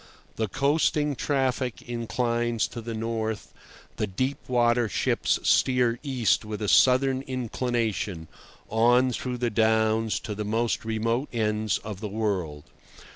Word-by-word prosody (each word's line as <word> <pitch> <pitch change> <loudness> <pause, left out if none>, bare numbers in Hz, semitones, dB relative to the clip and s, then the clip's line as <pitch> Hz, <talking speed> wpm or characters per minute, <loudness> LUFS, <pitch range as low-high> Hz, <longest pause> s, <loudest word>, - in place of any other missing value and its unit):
The 110 - -1
coasting 145 - +1
traffic 130 -3 -1
inclines 120 0 -1
to 120 -2 -7
the 115 0 -5
north; 110 -1 -3 0.4
the 105 - -1
deep 130 +9 -2
water 120 -2 +2
ships - - +1
steer 125 -2 +3
east 130 -7 +1
with 105 -1 -5
a - - -1
southern 130 +3 +4
inclination, 120 -8 -2 0.4
on 120 +3 +3
through 125 +1 -3
the 120 -1 -1
Downs, 110 0 +2
to 105 - -5
the 105 +1 -4
most 115 +3 -1
remote 115 +4 -1
ends 110 -3 0
of 105 -3 -7
the 110 - -4
world. 95 -9 -2
115 Hz, 130 wpm, -26 LUFS, 110-125 Hz, 0.4 s, southern